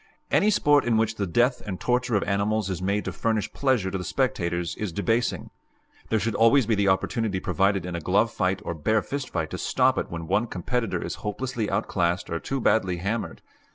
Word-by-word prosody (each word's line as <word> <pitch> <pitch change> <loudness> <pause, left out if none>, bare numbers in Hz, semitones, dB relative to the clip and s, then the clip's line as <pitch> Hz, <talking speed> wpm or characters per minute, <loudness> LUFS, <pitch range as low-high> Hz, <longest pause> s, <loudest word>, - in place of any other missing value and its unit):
Any 210 - +4
sport 145 -8 +4
in 115 -2 +2
which 110 0 0
the 100 - -1
death 120 +8 +2
and 95 -3 -5
torture 125 -1 0
of 100 - +2
animals 100 0 0
is 90 -1 -4
made 100 +2 0
to - - -2
furnish 110 -2 -1
pleasure 125 -9 +1
to 95 - -2
the - - -4
spectators 90 - -1
is 105 -4 -3
debasing. 115 +6 -1 0.6
There 110 - +2
should 115 +1 -1
always 115 +3 +4
be 110 - +1
the 100 -1 +2
opportunity 100 +1 0
provided 95 -1 +1
in 90 - -5
a - - -2
glove 100 +7 +2
fight 95 +2 0
or - - -2
bare 105 +7 +1
fist 140 -1 -4
fight 80 -4 -3
to - - -4
stop - - +2
it - - -4
when 85 -1 -5
one 100 +7 +1
competitor 115 +5 -2
is - - -5
hopelessly 115 +1 -3
outclassed 90 -3 -1
or 85 - -1
too 135 +8 -3
badly 95 -7 +2
hammered. 100 +6 -3
105 Hz, 210 wpm, -25 LUFS, 95-115 Hz, 0.6 s, Any